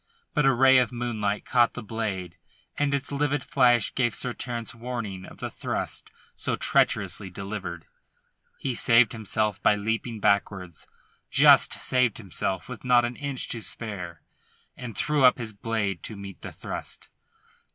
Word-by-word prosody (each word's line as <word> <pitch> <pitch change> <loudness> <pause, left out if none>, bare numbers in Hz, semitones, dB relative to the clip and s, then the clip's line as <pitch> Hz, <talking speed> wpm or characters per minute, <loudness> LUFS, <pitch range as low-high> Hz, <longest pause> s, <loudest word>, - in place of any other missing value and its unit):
But 150 -2 +3
a - - +6
ray 130 +1 +6
of 125 -3 +1
moonlight 110 -4 -2
caught 120 -2 +3
the 125 - -6
blade 100 -6 -4 0.4
and 145 -1 0
its 140 0 -2
livid 145 0 0
flash 120 -4 +3
gave 120 -5 +1
Sir 125 -2 -2
Terence 120 -2 -4
warning 115 -6 -5
of - - -13
the - - -5
thrust - - -3 0.3
so - - -1
treacherously 95 - +1
delivered. 95 -3 -6 0.7
He 130 - -2
saved 115 -1 +5
himself 110 -2 -1
by 105 - +4
leaping 115 +2 -2
backwards 95 -4 0 0.4
just - - +6
saved 125 -3 +1
himself 95 -2 -3
with 125 -2 -8
not 125 -1 +4
an 120 +1 -4
inch 140 -2 -4
to 115 - -2
spare 90 -8 -5 0.5
and 115 -5 -8
threw 150 -2 +1
up 125 - +7
his 115 -3 -4
blade 100 -3 -2
to 110 - -7
meet 100 -1 -9
the - - -7
thrust. - - -7
115 Hz, 155 wpm, -26 LUFS, 100-125 Hz, 0.7 s, up